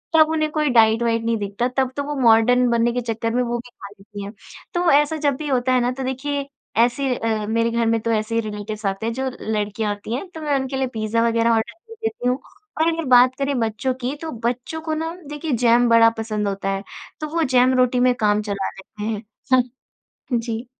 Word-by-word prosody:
तब 315 -1 +6
उन्हें 310 -1 +1
कोई 305 -1 +1
डाइट 225 -2 +4
वाइट 230 -1 +1
नहीं 230 0 0
दिखता 205 +4 -2
तब 260 -1 +2
तो 285 - 0
वो 295 +1 -4
मॉर्डन 245 +2 +5
बनने 235 0 +2
के 245 - -1
चक्कर 230 -1 -2
में 250 - +2
वो 240 0 -2
भी 240 +1 -9
खा 205 -4 -12
लेती 205 0 -10
हैं। 200 +2 -7 0.4
तो 350 -1 +2
ऐसा 295 +2 +3
जब 290 -2 +1
भी 305 - -5
होता 255 -2 +1
है 250 - +3
ना 245 - +1
तो 265 +1 -5
देखिए 275 +2 -3 0.4
ऐसे 250 +2 0
अ, 220 -2 -1
मेरे 230 +1 +1
घर 235 0 +1
में 225 0 +2
तो 230 - -1
ऐसे 215 +1 -1
ही 230 - +2
रिलेटिव्स 210 +1 -6
आते 195 +2 -2
हैं 230 - -1
जो 265 +2 -2
लड़कियाँ 210 0 -1
आती 210 +3 -5
हैं। 275 - -5
तो 320 -3 -9
मैं 295 -2 0
उनके 265 0 -4
लिए 265 -1 0
पिज़्ज़ा 225 +1 0
वग़ैरह 230 0 +2
आर्डर 225 0 0
कर 450 +7 -16
देती 445 - -2
हूँ 250 +2 0 0.4
और 325 - +3
अगर 330 -1 -1
बात 250 +1 +7
करें 275 -2 0
बच्चों 230 +3 -1
की 255 +4 -2
तो 325 - -4 0.2
बच्चों 250 +6 -2
को 315 -1 -3
ना 325 +1 -3 0.2
देखिए 295 +1 -4
जैम 240 +1 +5
बड़ा 230 0 +7
पसंद 215 -2 -2
होता 195 0 -2
है। 195 0 -2 0.4
तो 305 - -2
वो 330 - +2
जैम 255 -1 +4
रोटी 250 0 +3
में 250 0 +4
काम 210 -2 +2
चला 200 -2 -3
लेते 200 +2 -11
हैं। 215 -1 -2 1.1
हुँ, 240 - +2
जी। 230 +1 -4
240 Hz, 235 wpm, -22 LUFS, 220-265 Hz, 1.1 s, बात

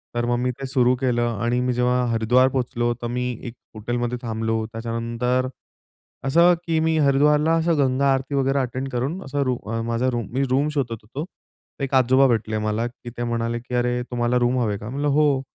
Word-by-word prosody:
तर 120 0 0
मग 120 0 +1
मी 125 0 0
ते 135 - -4
सुरू 130 -2 +3
केलं 120 -3 0
आणि 120 +1 +1
मी 125 0 0
जेव्हा 125 0 +1
हरिद्वार 120 +3 +3
पोहोचलो, 120 -2 -1
तर 120 - -2
मी 125 +1 -2
एक 120 - -6 0.2
हॉटेलमध्ये 120 +2 -2
थांबलो. 110 -1 -2
त्याच्यानंतर 115 +2 -1 0.8
असं, 170 +6 +5
की 160 -1 +1
मी 160 0 +1
हरिद्वारला 150 +3 +3
असं 165 -1 +2
गंगा 135 0 +2
आरती 135 +2 -2
वगैरे 135 0 +2
अटेंड 130 +1 -2
करून 135 +10 -2
असं 140 +1 -2
रू 130 -1 0 0.3
माझा 120 +2 0
रूम 120 -2 -3
मी 135 +1 +1
रूम 140 +3 +2
शोधत 135 -5 -1
होतो. 140 +9 -6 0.6
एक 135 - -3
आजोबा 130 +1 +5
भेटले 110 -2 0
मला, 110 +2 0
की 120 0 -11
ते 120 - -2
म्हणाले 120 0 -1
की 125 +1 -6
"अरे, 125 0 +1
तुम्हाला 120 0 +1
रूम 120 +1 +2
हवे 105 -4 0
का?" 105 +3 -8
म्हणलं, 145 +3 -2
"हो." 145 -2 +3
125 Hz, 195 wpm, -23 LUFS, 120-135 Hz, 0.8 s, असं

